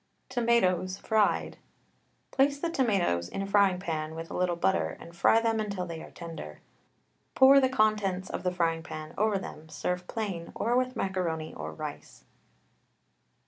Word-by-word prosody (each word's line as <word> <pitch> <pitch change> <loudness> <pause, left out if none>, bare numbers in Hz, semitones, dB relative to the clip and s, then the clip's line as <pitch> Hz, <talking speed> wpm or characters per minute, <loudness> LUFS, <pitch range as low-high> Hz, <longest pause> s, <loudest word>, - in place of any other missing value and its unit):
TOMATOES, 190 -6 +2
FRIED. 215 0 +1 0.7
Place 280 +1 +3
the 335 +2 -2
tomatoes 190 - +1
in 195 - -3
a - - -3
frying 195 -2 +3
pan 160 -3 -3
with 165 0 -7
a - - -5
little 180 -1 +1
butter, 85 - 0
and 170 0 -12
fry 225 +6 +5
them 225 -1 +1
until 200 -4 -2
they 165 -2 -6
are - - -10
tender. 165 - -8 0.8
Pour 270 +1 +8
the 260 -1 +3
contents 210 -6 +1
of - - -4
the 180 - 0
frying 165 -2 0
pan 155 0 -8
over 210 0 +2
them, 160 -4 -8
serve 180 +3 -3
plain, 195 -7 -4
or 235 +2 0
with 255 0 +1
macaroni 175 -6 -2
or 75 +1 -6
rice. 80 - -8
185 Hz, 160 wpm, -29 LUFS, 165-220 Hz, 0.8 s, Pour